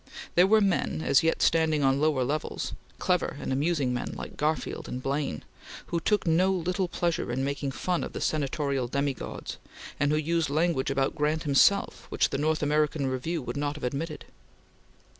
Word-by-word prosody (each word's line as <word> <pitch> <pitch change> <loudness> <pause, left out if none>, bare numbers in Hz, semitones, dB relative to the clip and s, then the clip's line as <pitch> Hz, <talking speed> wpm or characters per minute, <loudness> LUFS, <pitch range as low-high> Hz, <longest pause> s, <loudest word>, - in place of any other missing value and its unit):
There 180 +2 +5
were 215 +2 +5
men, 190 -4 0
as 140 - +4
yet 165 0 +1
standing 160 -3 +3
on 135 +1 +3
lower 150 -4 +2
levels 150 +5 -3 0.2
clever - - 0
and - - -2
amusing 140 -2 +1
men 125 - -3
like - - -7
Garfield 155 +2 -2
and 125 - -4
Blaine 135 - -2 0.5
who 170 - +2
took 205 +3 +1
no 180 +3 +3
little 180 +1 0
pleasure 170 -6 -1
in 130 +2 -1
making 140 0 -2
fun 175 +6 -1
of - - -6
the - - -4
senatorial 140 -3 -1
demi 140 +2 0
gods, - - -7 0.4
and 145 0 +2
who 155 - +2
used 160 0 0
language 155 -2 +1
about 135 0 +1
Grant 155 +1 0
himself 155 +7 +3
which - - +1
the - - -1
North 155 +1 +1
American 150 0 +1
Review 135 +5 -2
would - - -5
not 145 0 -1
have 150 - -9
admitted. 150 +5 -3
150 Hz, 180 wpm, -28 LUFS, 140-165 Hz, 0.5 s, There